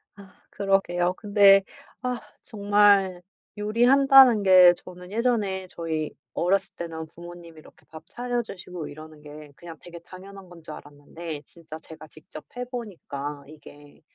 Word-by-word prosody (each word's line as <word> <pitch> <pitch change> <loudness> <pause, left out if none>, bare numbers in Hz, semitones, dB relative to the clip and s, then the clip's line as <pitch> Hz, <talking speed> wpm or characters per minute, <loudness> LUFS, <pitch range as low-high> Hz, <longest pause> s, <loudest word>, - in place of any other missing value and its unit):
아. 195 -3 -17
그러게요. 190 -3 0
근데 200 -1 +5 0.4
아 250 -1 -2 0.2
정말 200 -3 +2 0.4
요리한다는 245 +2 +5
게 185 -2 +7
저는 180 +1 -13
예전에 210 -5 -1
저희 160 -3 -4 0.2
어렸을 190 +3 0
때는 160 -2 -7
부모님 170 0 -13
이렇게 155 - -18
밥 160 -1 -12
차려주시고 225 -9 -5
이러는 155 0 -13
게 150 0 -12
그냥 170 +1 -11
되게 170 -1 -12
당연한 185 +2 -13
건 170 -2 -14
줄 155 - -8
알았는데 145 +2 -9
진짜 160 -2 -12
제가 160 0 -13
직접 155 0 -13
해보니까 195 - -7
이게 145 -1 -16
180 Hz, 295 characters per minute, -25 LUFS, 160-205 Hz, 0.4 s, 게